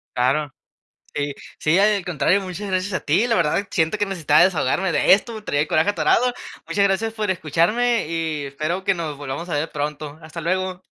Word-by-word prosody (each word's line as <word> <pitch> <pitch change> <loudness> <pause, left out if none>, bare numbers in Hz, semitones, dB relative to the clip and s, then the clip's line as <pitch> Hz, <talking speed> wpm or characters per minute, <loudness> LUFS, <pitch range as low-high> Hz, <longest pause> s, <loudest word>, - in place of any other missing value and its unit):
Claro. 135 +3 +1 0.6
Sí 145 -1 -2 0.2
sí, 155 +4 +2
al 205 -1 +3
contrario, 180 +3 +1
muchas 195 +2 -6
gracias 185 +1 -1
a 185 - -1
ti. 180 +11 +2
La 235 - +1
verdad, 170 +3 +1
siento 160 +5 +1
que 205 - +1
necesitaba 160 -6 +3
desahogarme 180 +1 +1
de - - +4
esto, 215 +2 +1
traía 145 -7 0
el - - -2
coraje 160 +5 +3
atorado. 245 +4 +2 0.3
Muchas 200 -1 +1
gracias 215 +3 +1
por 215 -2 -3
escucharme 190 +8 +1
y 160 -2 -2
espero 155 +7 -3
que 200 - +2
nos 160 -4 -4
volvamos 145 +5 -6
a - - -2
ver 150 +3 -1
pronto. 150 0 -4
Hasta 160 +1 -8
luego. 185 +2 -2
175 Hz, 190 wpm, -22 LUFS, 150-200 Hz, 0.6 s, de